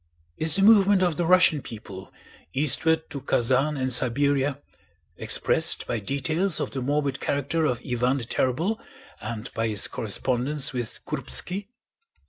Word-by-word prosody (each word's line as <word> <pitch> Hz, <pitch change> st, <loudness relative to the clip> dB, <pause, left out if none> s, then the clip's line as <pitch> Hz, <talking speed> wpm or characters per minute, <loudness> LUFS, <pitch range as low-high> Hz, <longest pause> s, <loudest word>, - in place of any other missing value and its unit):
Is 160 Hz, 0 st, +3 dB
the 195 Hz, -, +2 dB
movement 200 Hz, -2 st, +5 dB
of 175 Hz, -3 st, 0 dB
the 175 Hz, -, -1 dB
Russian 175 Hz, -4 st, +4 dB
people 100 Hz, -5 st, -10 dB, 0.4 s
eastward 160 Hz, +3 st, +3 dB
to 140 Hz, -, -6 dB
Kazán 135 Hz, +3 st, +1 dB
and 130 Hz, -1 st, 0 dB
Siberia 135 Hz, +3 st, 0 dB, 0.6 s
expressed -, -, +2 dB
by 120 Hz, -, -3 dB
details 155 Hz, -, -1 dB
of -, -, -3 dB
the 135 Hz, -, -4 dB
morbid 140 Hz, 0 st, -1 dB
character 145 Hz, +3 st, -1 dB
of 125 Hz, -6 st, -1 dB
Iván 125 Hz, +2 st, -1 dB
the 130 Hz, -, -5 dB
Terrible 165 Hz, -, -1 dB, 0.4 s
and 110 Hz, +2 st, -7 dB
by 115 Hz, 0 st, -1 dB
his 105 Hz, -2 st, +1 dB
correspondence 130 Hz, +7 st, -1 dB
with 120 Hz, -3 st, -6 dB
Kúrbski? 195 Hz, +3 st, -3 dB
140 Hz, 140 wpm, -24 LUFS, 125-160 Hz, 0.6 s, movement